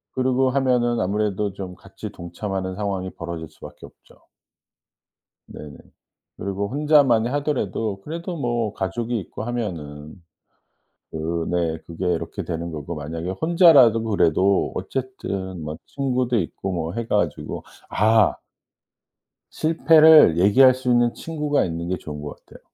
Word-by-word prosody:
그러고 130 0 +2
하면은 125 -3 +1
아무래도 105 +1 -1
좀 95 -2 -7
같이 95 +3 -10
동참하는 95 +2 -5
상황이 95 -2 -3
벌어질 85 -1 -7
수밖에 - - -12
없죠. - - -20 1.3
네네. 75 -1 -10 0.6
그리고 100 +1 -3
혼자만이 140 -5 +3
하더라도 115 -8 -2
그래도 170 - -6
뭐 120 -5 -1
가족이 115 +5 -3
있고 100 - -8
하면은 80 -11 -5 1.0
그 80 +2 -3
네 85 -2 0
그게 85 +2 -5
이렇게 - - -4
되는 85 +1 -4
거고 75 +2 -6
만약에 80 +4 -5
혼자라도 140 - +5
그래도 100 -2 +2
어쨌든 100 -9 -4
뭐 75 +1 -5
친구도 125 -3 -1
있고 95 +1 -3
뭐 85 -1 -3
해 115 +1 -4
가지고 90 -7 -2 0.3
아. 110 0 +3 1.2
실패를 155 - +6
얘기할 125 +8 +6
수 130 -1 -4
있는 120 -1 +3
친구가 150 -3 -1
있는 85 0 -4
게 90 - -1
좋은 75 -1 -8
것 75 - -9
같아요. - - -16
105 Hz, 290 characters per minute, -22 LUFS, 85-130 Hz, 1.3 s, 실패를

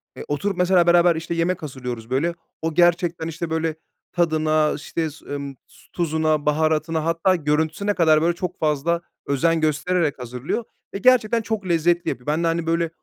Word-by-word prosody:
eee, - - -8
oturup 180 +7 -2
mesela 180 -1 +3
beraber, 170 -1 +5
işte, 165 +1 -4
yemek 170 0 -1
hazırlıyoruz 125 -5 -6
böyle. 155 +7 0 0.3
O 160 0 -2
gerçekten, 175 -1 +2
işte, 165 +1 -5
böyle 160 -1 -1 0.4
tadına, 155 -2 +2
işte, 160 +2 -3
s 150 - -16
ımm 140 -1 -5 0.4
tuzuna, 155 -3 0
baharatına 155 +1 +1
hatta 165 +3 +2
görüntüsüne 160 +6 0
kadar 155 -4 +4
böyle 170 +1 +1
çok 180 0 -5
fazla 155 +3 0 0.2
özen 160 +4 +1
göstererek 155 -1 0
hazırlıyor 125 - -4 0.3
ve - - -2
gerçekten 235 -1 +3
çok 215 -2 -3
lezzetli 170 +1 +2
yapıyor. 125 +4 -6
Ben 155 +3 0
de, - - +2
hani, 165 0 0
böyle 165 0 +1
165 Hz, 165 wpm, -22 LUFS, 155-175 Hz, 0.4 s, beraber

